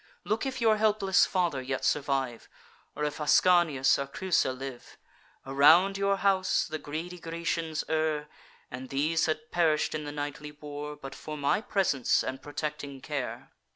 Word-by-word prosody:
Look 220 +5 -1
if 265 -1 -4
your 220 -2 +4
helpless 210 -3 +3
father 175 -8 0
yet 130 0 -3
survive, 135 -5 -1 0.5
Or 150 - -3
if 150 0 -2
Ascanius 155 -4 +4
or 140 - -3
Creusa 180 0 0
live. 130 -1 -8 0.5
Around 160 +8 +5
your 200 0 +1
house 190 -1 +2
the 155 0 -5
greedy 165 +5 -6
Grecians 165 -1 -3
err; 155 -1 0 0.4
And 130 +1 -7
these 155 +4 +1
had 155 0 -3
perish'd 160 -3 +2
in 155 -1 -3
the 145 - -5
nightly 145 0 -5
war, 150 0 -7
But 135 -2 -9
for 155 +1 -7
my 145 +7 +1
presence 185 - +1
and 130 - -5
protecting 145 -1 -5
care. 135 -2 -5
150 Hz, 155 wpm, -29 LUFS, 140-175 Hz, 0.5 s, Around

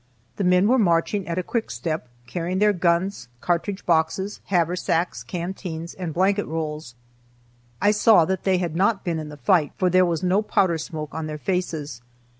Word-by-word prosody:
The 200 - -1
men 180 +2 +4
were 255 +3 +4
marching 185 +1 +1
at 170 0 -3
a 185 - 0
quick 230 +4 -2
step, 155 -6 -3 0.2
carrying 175 +8 -3
their 210 +1 +4
guns, 175 -5 0
cartridge 180 - -2
boxes, 170 +4 0
haversacks, 175 -1 0
canteens, 170 -2 -5
and 180 -3 -5
blanket 195 +5 +1
rolls. 155 -5 -4 0.8
I 205 - +4
saw 210 -4 +5
that 190 +1 -2
they 190 -1 +2
had 175 -3 -2
not 195 +3 +2
been 170 -3 -1
in 155 -1 -6
the 150 - -10
fight, 150 +3 +2
for 185 -1 +2
there 185 +1 +5
was 170 -1 -1
no 185 +3 +3
powder 185 -5 +1
smoke 155 -1 -6
on 160 -1 -4
their 150 0 -5
faces. 155 -7 -3
175 Hz, 180 wpm, -23 LUFS, 160-190 Hz, 0.8 s, saw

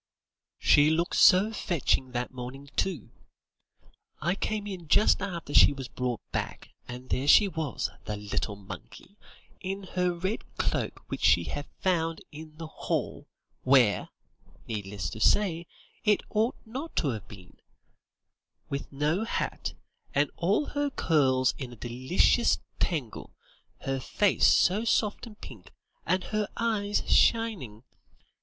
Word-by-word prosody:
"She 145 +1 +5
looked 165 +2 0
so 200 +4 +6
fetching 160 -10 0
that 125 +1 -3
morning, 130 +3 -8
too. 180 - -2 1.1
I 170 +3 0
came 210 +1 -3
in 185 -5 -7
just 195 +5 +4
after 170 -7 -5
she - - +7
was 135 -3 -7
brought 125 -2 -3
back, - - -4 0.2
and 125 +1 -9
there 135 +2 -1
she 205 +7 +7
was, 160 -6 -3
the 105 - -3
little 105 0 -3
monkey, 100 - -11 0.4
in 195 +1 -4
her 180 -1 +1
red 185 +5 -4
cloak - - -2
which - - -6
she 85 +1 +5
had 145 - -5
found 165 -3 0
in 155 0 -11
the 165 - -6
hall, 155 - -3 0.3
where, 130 -6 +4 0.6
needless 100 -4 -4
to 110 - -7
say, 170 - +2 0.4
it 210 -2 +3
ought 220 +3 +1
not 270 +9 -7
to 150 - +1
have 110 -5 -5
been; 90 -3 -14 1.1
with 140 0 -4
no 150 +8 0
hat, 230 - -3 0.4
and 145 0 +2
all 195 - +1
her 290 0 -1
curls 130 - +2
in 125 -3 -6
a - - -10
delicious 130 - +2 0.2
tangle, 145 - -3 0.5
her 135 0 -2
face 200 +9 +2
so 200 +5 +4
soft 220 0 0
and 210 -2 -14
pink, 110 -8 -11 0.4
and 185 +2 +1
her 215 +1 -2
eyes 210 -3 0
shining. 185 - +2
160 Hz, 135 wpm, -28 LUFS, 130-200 Hz, 1.1 s, she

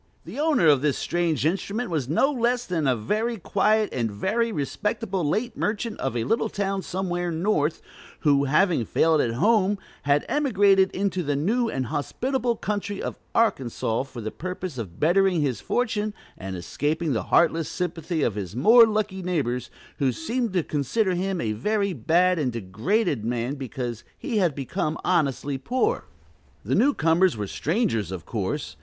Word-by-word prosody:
The - - -7
owner 300 - +3
of 145 -3 +5
this 150 -2 +1
strange 165 -5 0
instrument 200 +6 -1
was 145 -6 -1
no 270 - +3
less 245 -2 0
than 165 -5 -1
a 130 - +3
very 215 - -1
quiet 210 +3 +1
and 115 -3 -1
very 220 - 0
respectable 190 +4 -2
late 220 +10 -1
merchant 220 +1 -2
of 135 -2 -2
a 115 - 0
little 225 - 0
town 195 -1 -2
somewhere 175 -1 -2
"north," 165 -2 0 0.4
who, 140 -2 +3
having 155 0 +3
failed 155 +6 +3
at 115 -1 -1
home, 205 - +3 0.2
had 145 +1 +2
emigrated 200 -9 +3
into 190 -1 -1
the 145 -3 -1
new 225 - +1
and 130 -8 -2
hospitable 240 - -1
country 205 -2 -3
of - - -5 0.2
Arkansas, 125 - +1
for 130 -3 -8
the 110 0 -4
purpose 180 -4 -5
of 90 -7 -7
bettering 180 +1 +3
his 130 -7 -1
fortune 215 -3 -1 0.2
and 95 -1 -6
escaping 150 - -1
the 110 - 0
heartless 165 -1 +3
sympathy 165 -2 -2
of 115 - +1
his 100 -1 -5
more 225 - +7
lucky 210 -3 -1
neighbors, 130 -9 -1 0.3
who 135 -2 +2
seemed 225 - -2
to 180 -3 +1
consider 185 - 0
him 185 +1 -1
a 110 - -1
very 200 - 0
bad 170 +7 +2
and 130 -5 0
degraded 120 - -1
man 120 +3 -1
because 125 -4 -5
he 240 -7 -1
had 175 -7 +2
become 150 +3 -2
honestly 145 -5 0
poor. 245 - 0 0.6
The 120 - -1
new 270 - +3
comers 165 -2 +3
were 105 - -2
strangers, 140 - -1
of 90 -4 -6
course. - - -3
170 Hz, 165 wpm, -25 LUFS, 135-210 Hz, 0.6 s, more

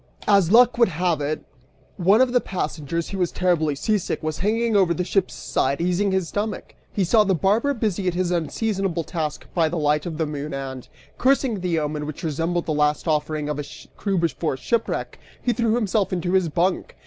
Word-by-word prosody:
As 195 -4 +4
luck 245 +1 +6
would 235 - +5
have 170 -2 0
it, 150 +2 -2 0.5
one 200 +5 +4
of 255 -1 +3
the 245 - +4
passengers, 165 -2 -3
who 195 - -4
was 175 -2 +1
terribly 165 -5 +1
seasick, 205 +2 -1
was 155 -1 -3
hanging 225 +3 +1
over 185 -4 +4
the 180 - -1
ship's 190 +1 0
side 140 +1 -1
easing 180 +3 +1
his 190 -3 0
stomach. 210 +1 -4 0.2
He 200 - 0
saw 215 +5 +4
the 195 -2 +1
barber 220 - +2
busy 205 -5 -1
at 175 - 0
his 180 -1 0
unseasonable 185 +1 -1
task 155 -2 -4
by 165 -3 +2
the 170 - -3
light 150 +1 +1
of 160 -3 -5
the 160 - 0
moon 150 -1 -5
and, 135 -2 -6 0.3
cursing 260 -4 +2
the 180 -2 -1
omen 150 -1 -2
which 155 +4 -7
resembled 165 +2 -1
the 155 - -1
last 150 +2 +1
offering 155 -1 0
of 150 -1 -3
a 145 - -4 0.3
crew 195 -2 -1
before 165 -4 -1
shipwreck, 230 - -2 0.2
he 245 - 0
threw 230 -2 +1
himself 210 -4 0
into 180 0 -1
his 185 -3 +3
bunk. 175 +4 -1
175 Hz, 200 wpm, -23 LUFS, 155-205 Hz, 0.5 s, luck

